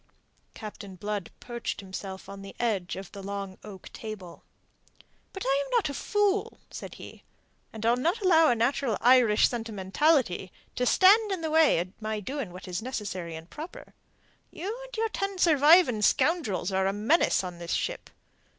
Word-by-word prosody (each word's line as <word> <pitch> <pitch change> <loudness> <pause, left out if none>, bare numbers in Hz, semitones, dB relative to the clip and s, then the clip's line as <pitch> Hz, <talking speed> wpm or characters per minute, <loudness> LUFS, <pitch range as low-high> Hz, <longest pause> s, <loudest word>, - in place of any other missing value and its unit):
Captain 205 -3 -9
Blood 205 0 -4
perched 240 -1 -5
himself 190 0 -7
on 200 0 -9
the 195 0 -10
edge 205 -7 -1
of 190 0 -8
the 200 - -9
long 195 -1 -6
oak 195 -3 -11
table. 205 -6 -8 0.9
"But 385 - -6
I 275 +2 +2
am - - -10
not 390 -10 +1
a - - -4
fool," 415 +6 0
said - - -8
he, - - -11 0.5
"and 220 0 -6
I'll 235 +1 +4
not 335 - 0
allow 330 -5 +5
a 245 - +3
natural 235 0 0
Irish 240 -3 +5
sentimentality 225 - 0 0.2
to 250 - 0
stand 410 - +5
in 375 -3 -2
the 320 -1 -2
way 320 -1 +5
of 175 +2 -2
my 215 0 -2
doing 255 0 -5
what 180 +1 -10
is 180 +1 -3
necessary 195 -9 -5
and 160 +1 -9
proper. 335 - -10 0.6
You 400 +6 -5
and - - -10
your 450 0 0
ten 395 -2 -3
surviving 305 -6 +5
scoundrels 215 - +1
are 190 0 +1
a 195 - 0
menace 220 - +2
on 180 -2 -7
this 170 -1 -4
ship. - - -3
225 Hz, 170 wpm, -28 LUFS, 195-320 Hz, 0.9 s, allow